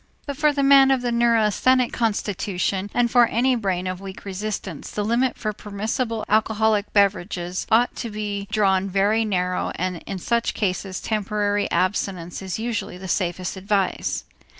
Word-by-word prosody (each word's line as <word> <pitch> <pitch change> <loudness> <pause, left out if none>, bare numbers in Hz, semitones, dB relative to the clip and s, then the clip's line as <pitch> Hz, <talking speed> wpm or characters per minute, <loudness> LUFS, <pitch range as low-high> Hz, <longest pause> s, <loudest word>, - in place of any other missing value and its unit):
But 285 - -4
for 300 +1 +3
the 280 -1 0
man 275 -1 +7
of 265 -2 +2
neurasthenic 235 +1 +2
constitution 200 -3 -1
and 240 -1 +1
for 240 -2 +6
any 250 +3 +2
brain 190 -5 -1
of 185 0 -4
weak 195 0 -9
resistance, 195 -4 -5
the 210 - -3
limit 240 +3 +1
for 215 -1 -3
permissible 215 +3 -3
alcoholic 215 -1 +2
beverages 190 -3 0
ought 235 +2 +3
to 235 - -4
be 205 -1 -4
drawn 195 -2 +2
very 200 +4 +2
narrow 180 -3 -1
and 180 0 -2
in 195 - -4
such 235 +5 0
cases 190 -2 -2
temporary 205 -1 -1
abstinence 185 -2 -1
is 190 -2 -4
usually 225 -5 -3
the 190 +1 -8
safest 180 0 -1
advice. 195 0 -1
205 Hz, 150 wpm, -23 LUFS, 190-230 Hz, -, man